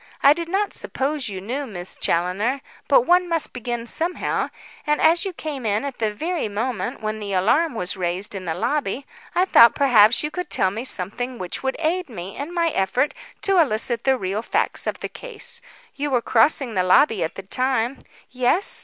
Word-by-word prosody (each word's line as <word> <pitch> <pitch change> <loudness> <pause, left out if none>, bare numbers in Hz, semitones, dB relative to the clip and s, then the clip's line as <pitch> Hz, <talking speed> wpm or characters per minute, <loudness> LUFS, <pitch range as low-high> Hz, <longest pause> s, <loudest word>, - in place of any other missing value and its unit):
I 280 - +8
did 335 +1 -5
not 395 +3 0
suppose 275 -2 -2
you 190 -2 -5
knew 260 +8 -4
Miss 180 -5 -6
Challoner, 195 +10 0 0.3
but - - +6
one 360 -5 +3
must 330 -2 -1
begin 240 -1 -4
somehow, 335 +8 -2 0.4
and 300 0 +2
as 335 +4 +4
you 385 - -2
came 300 -5 -5
in 215 +3 0
at 275 -2 -6
the 220 -2 +1
very 320 +7 -2
moment 225 +3 -3
when 215 0 -2
the 200 -2 -4
alarm 235 - +2
was 180 -4 -1
raised 185 +2 -2
in 190 -2 -6
the 160 -2 -2
lobby, 270 0 -1 0.3
I 360 - +4
thought 235 -10 +7
perhaps 240 -5 +5
you 300 - -2
could 360 -1 -5
tell 190 - +2
me 225 +5 -5
something 245 +5 -2
which 180 -4 -4
would 265 0 -1
aid 335 +1 -1
me 190 -4 -7
in 290 +4 -5
my 340 -1 +1
effort 245 +4 0 0.3
to 390 -2 +3
elicit 235 -3 0
the 265 -1 +3
real 195 0 -2
facts - - -1
of - - -3
the - - -2
case. 475 -1 -6 0.3
You 290 +1 -3
were 250 -3 +2
crossing 245 +1 +3
the 185 - +2
lobby 190 +3 +4
at 160 - -4
the 195 - -7
time 255 +4 -1 0.2
" - - -28
"Yes." 255 +10 +3
250 Hz, 200 wpm, -22 LUFS, 205-305 Hz, 0.4 s, I